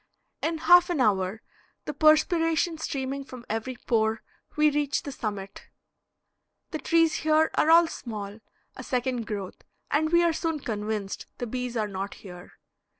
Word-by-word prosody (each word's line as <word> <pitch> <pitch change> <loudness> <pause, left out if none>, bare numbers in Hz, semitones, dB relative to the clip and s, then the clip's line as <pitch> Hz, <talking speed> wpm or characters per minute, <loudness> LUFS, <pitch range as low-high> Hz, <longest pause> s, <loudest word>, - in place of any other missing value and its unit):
In 325 0 -1
half 350 +2 +6
an 345 -5 -1
hour, 200 -2 +1 0.4
the 300 - -4
perspiration 320 +2 +3
streaming 275 -2 -3
from 255 -2 -11
every 225 +3 -3
pore, 220 -1 +1 0.3
we 300 0 +4
reach 290 -1 0
the 285 - -5
summit. 205 -6 -6 1.0
The 310 - -3
trees 330 -1 +2
here 315 0 +2
are 310 - +2
all 335 +1 +7
small, 210 -8 -7 0.4
a - - -8
second 250 -2 -2
growth, 200 -4 -5 0.3
and 310 +2 +1
we 345 0 +5
are 340 -1 +3
soon 325 -1 -2
convinced 210 -3 -4
the 245 - -3
bees 250 0 -4
are 215 -1 0
not 195 0 -5
here. 180 -3 -12
260 Hz, 150 wpm, -27 LUFS, 215-315 Hz, 1.0 s, all